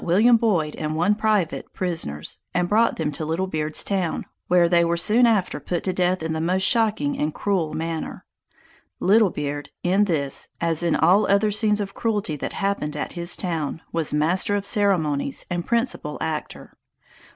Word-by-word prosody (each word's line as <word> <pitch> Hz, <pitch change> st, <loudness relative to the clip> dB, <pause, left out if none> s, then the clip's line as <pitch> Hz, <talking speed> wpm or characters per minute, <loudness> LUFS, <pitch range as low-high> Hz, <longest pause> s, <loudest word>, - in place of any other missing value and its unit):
William 215 Hz, +8 st, +5 dB
Boyd 185 Hz, -10 st, +1 dB
and 155 Hz, 0 st, -3 dB
one 175 Hz, +6 st, +3 dB
private, 210 Hz, -5 st, 0 dB
prisoners, 165 Hz, -, -4 dB, 0.2 s
and 180 Hz, 0 st, +1 dB
brought 225 Hz, +4 st, +3 dB
them 155 Hz, -2 st, -2 dB
to 150 Hz, -, -5 dB
Little 165 Hz, +4 st, -1 dB
Beard's 155 Hz, -4 st, -2 dB
Town, 190 Hz, -4 st, -2 dB, 0.2 s
where 175 Hz, -1 st, +4 dB
they 170 Hz, 0 st, +4 dB
were 170 Hz, 0 st, 0 dB
soon 225 Hz, +7 st, +4 dB
after 210 Hz, -5 st, +1 dB
put 175 Hz, -2 st, -3 dB
to 185 Hz, -, -1 dB
death 180 Hz, -1 st, 0 dB
in 160 Hz, 0 st, -2 dB
the 160 Hz, -, -2 dB
most 185 Hz, +3 st, +1 dB
shocking 215 Hz, -10 st, +2 dB
and 150 Hz, +1 st, 0 dB
cruel 180 Hz, -3 st, -1 dB
manner. 165 Hz, 0 st, -4 dB, 0.7 s
Little 210 Hz, +2 st, +4 dB
Beard, 145 Hz, -2 st, -4 dB
in 190 Hz, +4 st, +3 dB
this, 145 Hz, -7 st, -1 dB
as 165 Hz, -1 st, 0 dB
in 170 Hz, -2 st, +1 dB
all 185 Hz, +6 st, +4 dB
other 200 Hz, +2 st, +3 dB
scenes 210 Hz, 0 st, +2 dB
of 195 Hz, -1 st, -5 dB
cruelty 210 Hz, -8 st, -1 dB
that -, -, -5 dB
happened 195 Hz, -7 st, -2 dB
at -, -, -4 dB
his 170 Hz, 0 st, -1 dB
town, 165 Hz, -4 st, -3 dB
was 165 Hz, -2 st, 0 dB
master 170 Hz, +7 st, +1 dB
of 200 Hz, -1 st, -2 dB
ceremonies, 160 Hz, -10 st, +1 dB
and 175 Hz, -1 st, -3 dB
principal 235 Hz, +2 st, -1 dB
actor. -, -, -5 dB
175 Hz, 175 wpm, -23 LUFS, 160-205 Hz, 0.7 s, William